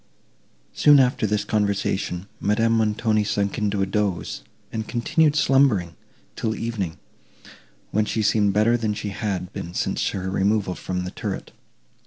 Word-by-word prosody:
Soon 145 Hz, -1 st, +6 dB
after 125 Hz, -3 st, +2 dB
this 105 Hz, 0 st, 0 dB
conversation, 100 Hz, -3 st, -1 dB
Madame 115 Hz, +3 st, +2 dB
Montoni 110 Hz, -1 st, +2 dB
sunk 100 Hz, -1 st, -1 dB
into 100 Hz, -2 st, 0 dB
a -, -, +2 dB
dose, 100 Hz, -3 st, -2 dB, 0.3 s
and 110 Hz, -1 st, -4 dB
continued 150 Hz, +5 st, +2 dB
slumbering, 130 Hz, -, +3 dB, 0.4 s
till 110 Hz, -1 st, -2 dB
evening, 105 Hz, -8 st, -3 dB, 0.9 s
when 105 Hz, +1 st, +2 dB
she 110 Hz, 0 st, -1 dB
seemed 105 Hz, -1 st, +3 dB
better 110 Hz, +4 st, +3 dB
than 110 Hz, -3 st, -1 dB
she 105 Hz, 0 st, -4 dB
had 95 Hz, -3 st, -3 dB
been 85 Hz, -, -6 dB
since -, -, 0 dB
her 95 Hz, -1 st, -4 dB
removal 100 Hz, 0 st, +1 dB
from 90 Hz, 0 st, -4 dB
the 90 Hz, -, -5 dB
turret. -, -, -5 dB
105 Hz, 145 wpm, -23 LUFS, 95-115 Hz, 0.9 s, Soon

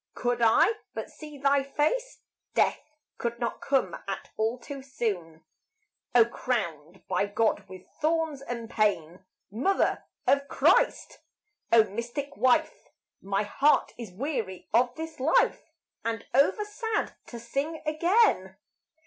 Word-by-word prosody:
could 245 Hz, 0 st, 0 dB
I 230 Hz, -, +5 dB, 0.2 s
but -, -, -5 dB
see 300 Hz, -2 st, -10 dB
thy 280 Hz, 0 st, +3 dB
face 305 Hz, -, -1 dB, 0.3 s
Death 300 Hz, 0 st, 0 dB, 0.2 s
could 235 Hz, 0 st, -2 dB
not 235 Hz, -1 st, -3 dB
come 270 Hz, -1 st, +1 dB
at -, -, -5 dB
all 225 Hz, +3 st, 0 dB
too 275 Hz, +2 st, -8 dB
soon. 195 Hz, -12 st, -4 dB, 0.7 s
O 235 Hz, -2 st, +8 dB
crowned 190 Hz, -, -3 dB
by 200 Hz, -, +1 dB
God 215 Hz, 0 st, 0 dB
with 185 Hz, -1 st, -10 dB, 0.2 s
thorns 320 Hz, -2 st, 0 dB
and 235 Hz, -4 st, -5 dB
pain! 190 Hz, -6 st, 0 dB, 0.3 s
Mother 275 Hz, -, +1 dB, 0.2 s
of 280 Hz, 0 st, +3 dB
Christ! -, -, +2 dB, 0.5 s
O 230 Hz, -1 st, +8 dB
mystic 235 Hz, +7 st, -5 dB
wife! 260 Hz, +8 st, +2 dB, 0.3 s
My 195 Hz, +1 st, 0 dB
heart 275 Hz, +8 st, +2 dB
is 230 Hz, -5 st, -8 dB
weary 210 Hz, -, -4 dB
of 245 Hz, +2 st, +4 dB
this 320 Hz, -2 st, -7 dB
life 310 Hz, +3 st, +2 dB, 0.3 s
And 225 Hz, 0 st, -3 dB
over 285 Hz, -, +3 dB
sad 435 Hz, +1 st, -2 dB
to 240 Hz, -, -8 dB
sing 275 Hz, +7 st, -3 dB
again. 310 Hz, -, +2 dB
245 Hz, 130 wpm, -28 LUFS, 215-300 Hz, 0.7 s, O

